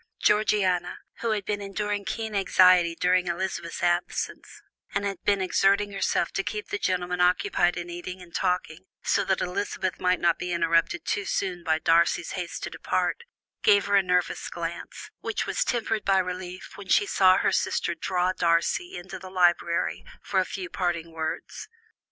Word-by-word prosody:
Georgiana, 195 Hz, -4 st, +2 dB, 0.2 s
who 235 Hz, -, -1 dB
had 210 Hz, -3 st, -1 dB
been 205 Hz, 0 st, -2 dB
enduring 205 Hz, 0 st, -3 dB
keen 220 Hz, +5 st, -4 dB
anxiety 185 Hz, -3 st, +5 dB
during 180 Hz, +1 st, +2 dB
Elizabeth's 175 Hz, -1 st, -3 dB
absence, 175 Hz, 0 st, -2 dB, 0.3 s
and 200 Hz, -, 0 dB
had 195 Hz, -2 st, -3 dB
been 200 Hz, -1 st, +2 dB
exerting 200 Hz, +2 st, +2 dB
herself 195 Hz, -3 st, 0 dB
to 195 Hz, -, -2 dB
keep 210 Hz, +1 st, -5 dB
the 205 Hz, -, -2 dB
gentlemen 180 Hz, -1 st, -1 dB
occupied 180 Hz, -, +2 dB
in 175 Hz, 0 st, -4 dB
eating 175 Hz, +1 st, -7 dB
and 175 Hz, -2 st, -14 dB
talking, 180 Hz, -1 st, -2 dB, 0.2 s
so -, -, +2 dB
that 190 Hz, -1 st, 0 dB
Elizabeth 185 Hz, 0 st, -2 dB
might 180 Hz, 0 st, +2 dB
not 170 Hz, -1 st, +2 dB
be 180 Hz, -, -3 dB
interrupted 165 Hz, -1 st, +1 dB
too 205 Hz, -, -1 dB
soon 185 Hz, -2 st, -2 dB
by 160 Hz, -2 st, +2 dB
Darcy's 165 Hz, 0 st, +2 dB
haste 180 Hz, -2 st, -5 dB
to -, -, -4 dB
depart, 470 Hz, -, -1 dB, 0.4 s
gave 200 Hz, -1 st, +5 dB
her 200 Hz, -, +2 dB
a 200 Hz, -, +6 dB
nervous 180 Hz, -1 st, 0 dB
glance, -, -, -6 dB
which -, -, -2 dB
was -, -, 0 dB
tempered 225 Hz, -, -1 dB
by 195 Hz, -1 st, +3 dB
relief 180 Hz, 0 st, -4 dB
when 200 Hz, -2 st, -10 dB
she 410 Hz, -, +4 dB
saw 185 Hz, -, +5 dB
her -, -, +2 dB
sister -, -, 0 dB
draw 185 Hz, 0 st, 0 dB
Darcy 170 Hz, -, +1 dB
into 185 Hz, +2 st, -8 dB
the 185 Hz, 0 st, -10 dB
library 175 Hz, -2 st, +1 dB, 0.2 s
for -, -, 0 dB
a -, -, +2 dB
few 370 Hz, -, -5 dB
parting 175 Hz, -, -2 dB
words. 160 Hz, -, -5 dB
185 Hz, 170 wpm, -26 LUFS, 175-200 Hz, 0.4 s, a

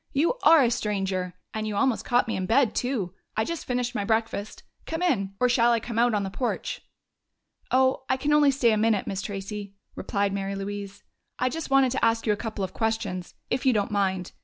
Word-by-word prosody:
"You 300 Hz, -, +2 dB
are 320 Hz, -3 st, +7 dB
a 240 Hz, -, +2 dB
stranger! 195 Hz, -5 st, -2 dB, 0.2 s
And 215 Hz, 0 st, -3 dB
you 210 Hz, -, -3 dB
almost 255 Hz, +2 st, +1 dB
caught 245 Hz, +1 st, +2 dB
me 225 Hz, -, -1 dB
in 185 Hz, -1 st, -2 dB
bed, 235 Hz, 0 st, +3 dB
too! 235 Hz, -9 st, -2 dB, 0.2 s
I 220 Hz, -, +3 dB
just 335 Hz, -1 st, -4 dB
finished 245 Hz, 0 st, -1 dB
my 205 Hz, -, -1 dB
breakfast. 220 Hz, -1 st, -2 dB, 0.2 s
Come 325 Hz, +2 st, -2 dB
in 195 Hz, -, 0 dB
or 250 Hz, -, +4 dB
shall 240 Hz, -1 st, +4 dB
I 230 Hz, -, +2 dB
come 230 Hz, 0 st, -4 dB
out 240 Hz, -1 st, +3 dB
on 205 Hz, -, 0 dB
the 195 Hz, -, -4 dB
porch?" 245 Hz, +4 st, -3 dB, 0.9 s
"Oh, 260 Hz, +1 st, +3 dB
I 260 Hz, -, +2 dB
can 295 Hz, +3 st, 0 dB
only 295 Hz, -1 st, +5 dB
stay 265 Hz, -4 st, +3 dB
a 215 Hz, -, +2 dB
minute, 215 Hz, -2 st, +2 dB
Miss 195 Hz, -1 st, -3 dB
Tracey," 200 Hz, 0 st, -6 dB, 0.2 s
replied 200 Hz, -1 st, -1 dB
Mary 195 Hz, 0 st, -2 dB
Louise. 200 Hz, 0 st, -6 dB, 0.3 s
"I 255 Hz, -, +1 dB
just 320 Hz, +4 st, -5 dB
wanted 270 Hz, -2 st, +4 dB
to 260 Hz, -, -2 dB
ask 230 Hz, 0 st, +2 dB
you 215 Hz, -, +3 dB
a -, -, -1 dB
couple 215 Hz, -2 st, -4 dB
of 190 Hz, -, -4 dB
questions, 220 Hz, -5 st, -2 dB, 0.2 s
if 250 Hz, -, 0 dB
you 260 Hz, -2 st, +4 dB
don't 205 Hz, -2 st, 0 dB
mind.... 190 Hz, -3 st, 0 dB
220 Hz, 220 wpm, -26 LUFS, 200-250 Hz, 0.9 s, are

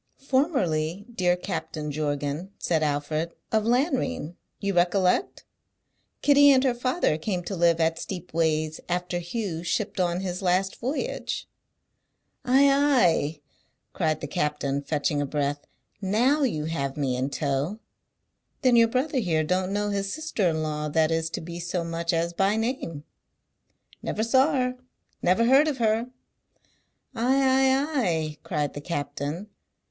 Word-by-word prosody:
"Formerly, 205 Hz, -, 0 dB
dear 180 Hz, -4 st, +2 dB
Captain 155 Hz, -5 st, -4 dB
Jorgan," 145 Hz, +3 st, -2 dB
said 165 Hz, -3 st, 0 dB
Alfred, 155 Hz, +2 st, -1 dB, 0.2 s
"of 220 Hz, -1 st, +2 dB
Lanrean, 250 Hz, -, 0 dB, 0.2 s
you 200 Hz, 0 st, -1 dB
recollect? 180 Hz, -, +1 dB, 0.8 s
Kitty 285 Hz, 0 st, +7 dB
and 265 Hz, -2 st, +5 dB
her 260 Hz, -3 st, +3 dB
father 250 Hz, -, 0 dB
came 180 Hz, +1 st, -2 dB
to 195 Hz, -, -4 dB
live 170 Hz, -1 st, +3 dB
at 165 Hz, 0 st, +1 dB
Steepways 160 Hz, -4 st, -1 dB
after 175 Hz, 0 st, -1 dB
Hugh 175 Hz, -2 st, -4 dB
shipped 195 Hz, +3 st, -2 dB
on 175 Hz, 0 st, +1 dB
his 180 Hz, -1 st, -4 dB
last 190 Hz, +1 st, +1 dB
voyage." 260 Hz, +6 st, -3 dB, 1.0 s
"Ay, 270 Hz, +3 st, +5 dB
ay!" 245 Hz, -, +3 dB, 0.5 s
cried 155 Hz, -3 st, 0 dB
the 145 Hz, -, -4 dB
captain, 145 Hz, -1 st, -1 dB
fetching 145 Hz, 0 st, -1 dB
a -, -, 0 dB
breath. 145 Hz, 0 st, -2 dB, 0.3 s
"Now 240 Hz, +10 st, +2 dB
you 160 Hz, -, 0 dB
have 140 Hz, -4 st, -3 dB
me 135 Hz, -4 st, 0 dB
in 130 Hz, +2 st, -1 dB
tow. 145 Hz, +7 st, -1 dB, 0.9 s
Then 255 Hz, -2 st, +5 dB
your 230 Hz, -1 st, +6 dB
brother 260 Hz, +4 st, 0 dB
here 165 Hz, -8 st, +1 dB
don't 185 Hz, +4 st, 0 dB
know 205 Hz, +1 st, 0 dB
his 200 Hz, -1 st, -2 dB
sister 310 Hz, -, 0 dB
in 160 Hz, -1 st, -1 dB
law 150 Hz, 0 st, -2 dB
that 160 Hz, +1 st, +2 dB
is 165 Hz, 0 st, 0 dB
to -, -, -5 dB
be 170 Hz, +1 st, -7 dB
so 175 Hz, 0 st, -2 dB
much 170 Hz, 0 st, -2 dB
as 170 Hz, 0 st, 0 dB
by 195 Hz, +4 st, +2 dB
name?" 220 Hz, -, -3 dB, 1.0 s
"Never 220 Hz, -, -2 dB
saw 260 Hz, +6 st, +3 dB
her; 255 Hz, -2 st, 0 dB, 0.4 s
never 185 Hz, +6 st, +3 dB
heard 270 Hz, +5 st, +5 dB
of 295 Hz, -4 st, -1 dB
her!" 225 Hz, 0 st, +1 dB, 1.1 s
"Ay, 245 Hz, +4 st, +1 dB
ay, 270 Hz, +2 st, +3 dB
ay!" 160 Hz, -6 st, -1 dB
cried 150 Hz, -4 st, -2 dB
the 145 Hz, -, -6 dB
captain. 145 Hz, +3 st, -4 dB
180 Hz, 145 wpm, -26 LUFS, 155-235 Hz, 1.1 s, Kitty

